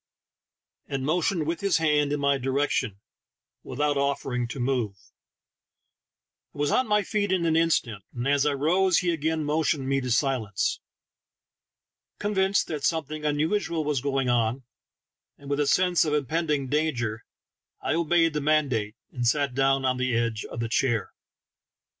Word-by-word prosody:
and 135 -1 -3
motioned 170 +1 +1
with 165 +2 -2
his 200 -4 +2
hand 150 -2 +2
in 145 - 0
my 140 0 +2
direction, 130 -5 -1 0.6
without 145 +2 -1
offering 135 -3 -1
to 130 - -7
move. 120 -5 -1 1.6
I - - -12
was 145 0 0
on 255 - +2
my 210 -1 +2
feet 205 0 -1
in 180 -3 +1
an 160 -1 +2
instant, 135 - +1
and 120 +1 -4
as 140 0 +3
I 145 -1 +2
rose 175 +6 +2
he 180 -1 +1
again 160 0 -1
motioned 150 -2 0
me 135 0 +1
to 125 - -4
silence. 120 -6 0 1.4
Convinced 195 -1 +1
that 150 -3 -5
some 160 -1 +1
thing 150 +1 -7
unusual 160 +3 0
was 145 -4 -1
going 135 -1 0
on, 120 +1 +1 0.7
and 140 0 -9
with 140 - 0
a 145 - +1
sense 180 +1 +3
of 150 -2 0
impending 150 -1 -1
danger, 125 -7 -1 0.6
I - - -1
obeyed 165 0 +2
the 150 - -1
mandate, 140 -8 +1 0.2
and 120 -2 -2
sat 140 +1 +1
down 135 0 +2
on 130 -1 +1
the 130 -2 0
edge 115 -2 -1
of 115 - -6
the 115 - -1
chair. 115 -2 0
145 Hz, 160 wpm, -26 LUFS, 130-160 Hz, 1.6 s, as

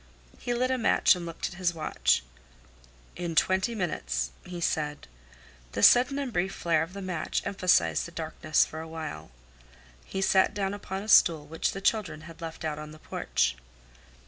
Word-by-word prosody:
He 245 - -2
lit 255 +2 +1
a 260 - 0
match 230 - +4
and 175 -1 -6
looked 165 - -4
at 175 - -11
his 175 -1 +1
watch. 65 - +1 0.9
"In 170 -2 -4
twenty 190 +8 +2
minutes," - - -2
he 180 -1 -7
said. 150 - -2 0.7
The - - -2
sudden 250 +3 +6
and 275 -4 -3
brief 185 +1 -1
flare 165 -2 +1
of 165 +3 -4
the 200 0 -6
match 180 -4 -2
emphasized 185 -3 +2
the - - -12
darkness 160 -2 +1
for 160 - -8
a 160 - -7
while. 155 - -7 0.7
He 190 - -5
sat 190 -1 +3
down 195 -1 -1
upon 195 -1 -5
a - - -9
stool 165 -8 +5
which 160 +2 -2
the 195 - -6
children 185 -8 0
had 165 +2 -12
left 160 -1 -6
out 150 -1 -2
on 150 0 -8
the - - -12
porch. 70 - -1
170 Hz, 180 wpm, -28 LUFS, 155-195 Hz, 0.9 s, sudden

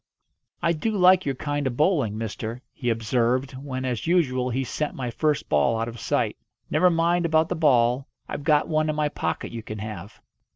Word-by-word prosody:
"I 170 - +3
do 215 +8 -2
like 185 -2 +5
your 135 - 0
kind 145 +1 -2
of 125 -2 -4
bowling, 145 - +2
mister," 115 +2 -5
he 120 -4 -3
observed 120 +3 +1
when, 130 -1 -5
as 125 +2 -2
usual, 130 -8 +2
he 130 +2 -1
sent 150 +4 -3
my 125 -3 -3
first 150 +3 0
ball 75 +10 +2
out 115 - -1
of 120 0 -7
sight. - - 0 0.3
"Never 175 +4 +4
mind 170 +1 +2
about 160 -1 +2
the 180 - -1
ball. 130 -4 +3 0.2
I've 145 - -5
got 150 -1 +3
one 155 -1 +1
in 155 - -1
my 150 -1 +1
pocket - - -3
you 115 - -5
can 110 -1 -7
have." 100 -1 -7
135 Hz, 200 wpm, -25 LUFS, 120-155 Hz, 0.3 s, like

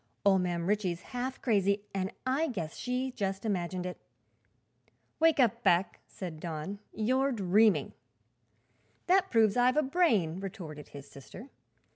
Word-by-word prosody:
"Ol' 195 -1 +5
Mam 175 -2 -1
Ritchie's 190 -3 0
half 255 +1 -3
crazy, 200 -3 +2
an' 190 -1 -1 0.2
I 275 +5 +1
guess 175 - -5
she 250 +1 -2
just 195 -2 -3
imagined 180 -3 -2
it." 180 - -6 1.2
"Wake 325 -2 +4
up, 235 -2 +3
Beck," 175 -4 +2
said 170 -5 -7
Don; 165 +4 -5
"you're 260 +5 +1
dreaming." 210 -1 +3 1.1
"That 375 +1 +3
proves 220 -3 +3
I've 250 +2 +3
a 305 - +4
brain," 235 - +2
retorted 175 -7 -7
his 140 -1 -11
sister. 185 - -12
200 Hz, 135 wpm, -30 LUFS, 180-250 Hz, 1.2 s, Ol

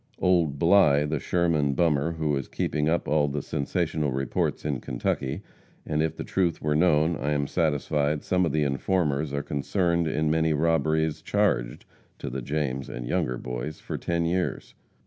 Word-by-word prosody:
Old 85 -6 +2
Bly, 80 -4 +5
the 75 0 -1
Sherman 80 -4 +1
bummer, 80 -1 +2
who 80 -2 0
is 70 -2 -3
keeping 75 0 -1
up 85 +1 0
all 75 -1 +2
the 70 0 -3
sensational 75 0 -1
reports 70 +2 -1
in 70 -4 -2
Kentucky, 65 - -2 0.4
and 75 0 0
if 80 0 -1
the - - -4
truth 90 -3 0
was 75 0 0
known, 80 0 +3
I 75 0 -1
am 70 -1 0
satisfied 75 -1 0
some 90 0 +1
of 80 - +1
the 75 +1 +1
informers 75 +1 0
are 70 0 -2
concerned 85 +4 0
in 75 0 0
many 80 0 +2
robberies 80 0 +1
charged 95 -11 0 0.3
to - - -6
the 65 +1 -4
James 70 0 -2
and - - -6
Younger 60 +1 -1
Boys 60 +5 -5
for - - -6
ten 85 0 -1
years. 90 +2 -2
75 Hz, 170 wpm, -26 LUFS, 70-85 Hz, 0.4 s, Bly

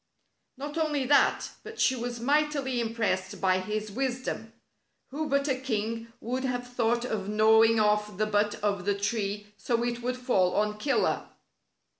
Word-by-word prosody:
Not 290 +4 -4
only 300 -4 0
that, 285 +2 +3
but 440 +1 -10
she 260 - +3
was 240 0 -4
mightily 280 -1 +1
im 225 0 -3
pressed 190 -4 -1
by 185 -1 +3
his 215 +2 -3
wisdom. 255 +2 -3 0.6
Who 305 +2 -3
but 280 +1 +1
a 270 - +3
king 230 -3 -3
would 255 +3 -3
have 245 -1 -2
thought 235 0 +1
of 205 -5 -3
gnawing 220 +1 +5
off 210 -2 +1
the 215 - +2
butt 210 0 +1
of 200 -3 0
the 200 0 +1
tree 205 0 -2
so 235 -1 0
it 240 0 -2
would 250 +1 -2
fall 195 -8 +2
on 210 0 0
Killer! 275 +4 +1
230 Hz, 165 wpm, -28 LUFS, 210-260 Hz, 0.6 s, gnawing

